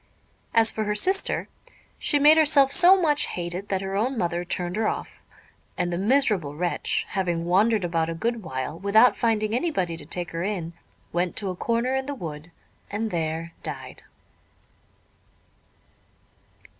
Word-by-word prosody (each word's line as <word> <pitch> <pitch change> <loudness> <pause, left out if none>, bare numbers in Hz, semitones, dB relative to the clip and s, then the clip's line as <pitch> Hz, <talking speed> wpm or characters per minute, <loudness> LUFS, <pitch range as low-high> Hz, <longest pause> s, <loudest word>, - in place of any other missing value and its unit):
As 225 -1 +4
for 220 - -3
her 210 0 -1
sister, 380 - 0 0.5
she 290 - +1
made 295 +2 +7
herself 290 -3 +5
so 370 +5 +6
much 300 -4 +2
hated 175 +3 -5
that 190 -1 -1
her 195 0 -4
own 245 +6 0
mother 175 -2 -1
turned 175 0 -1
her 220 0 0
off; - - -5 0.5
and 175 0 -1
the - - -1
miserable 205 - +2
wretch, 175 +2 0
having 175 -4 -1
wandered 200 +3 +2
about 165 -1 -1
a 165 - -3
good 230 +6 -2
while 130 -1 -5
without 215 +5 +4
finding 220 -2 0
anybody 230 - -1
to - - -12
take 175 -1 -5
her 165 - -4
in, 180 -4 -3 0.4
went 175 +1 -1
to 195 -3 -1
a - - -6
corner 235 +6 -1
in 265 0 -2
the 285 - -3
wood 160 - -8 0.4
and 215 +2 -3
there 165 0 -3
died. 135 -4 -8
195 Hz, 155 wpm, -25 LUFS, 170-235 Hz, 0.5 s, made